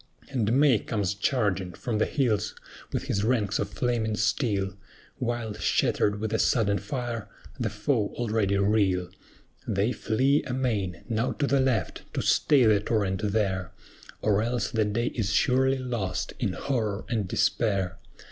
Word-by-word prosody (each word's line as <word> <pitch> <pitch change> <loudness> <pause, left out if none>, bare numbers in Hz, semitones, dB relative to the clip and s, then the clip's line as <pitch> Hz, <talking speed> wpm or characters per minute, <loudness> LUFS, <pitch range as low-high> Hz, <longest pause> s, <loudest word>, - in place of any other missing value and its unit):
And 115 -5 +1
MAY 140 -7 +5
comes 100 -4 -1
charging 100 -4 0
from 110 +4 -3
the - - +2
hills 120 - 0 0.4
with - - -2
his 100 - -1
ranks 110 -3 +1
of 100 - -1
flaming 115 -2 -1
steel, 100 -3 0 0.4
While, 120 -3 -2
shattered 105 -1 +1
with 110 +1 -3
a 110 - +1
sudden 100 -5 +2
fire, 115 0 -4 0.3
the - - 0
foe 105 0 0
already 110 -4 +1
reel: 100 -3 +2 0.6
They 100 +5 +1
flee 130 +5 +2
amain! 110 -10 -1
Now 115 +1 0
to 145 - -1
the 140 0 +2
left, 130 -4 -1
to - - 0
stay 140 -5 +4
the 105 -2 +5
torrent 100 -3 0
there, 95 -4 -1 0.5
Or 105 -1 +3
else 120 +2 -1
the 110 -2 +1
day 115 +4 -1
is 100 -4 -1
surely 130 +3 +3
lost, 120 -8 -3
in - - 0
horror 110 -7 -2
and 110 -5 -1
despair! 95 -1 0
110 Hz, 150 wpm, -27 LUFS, 100-120 Hz, 0.6 s, MAY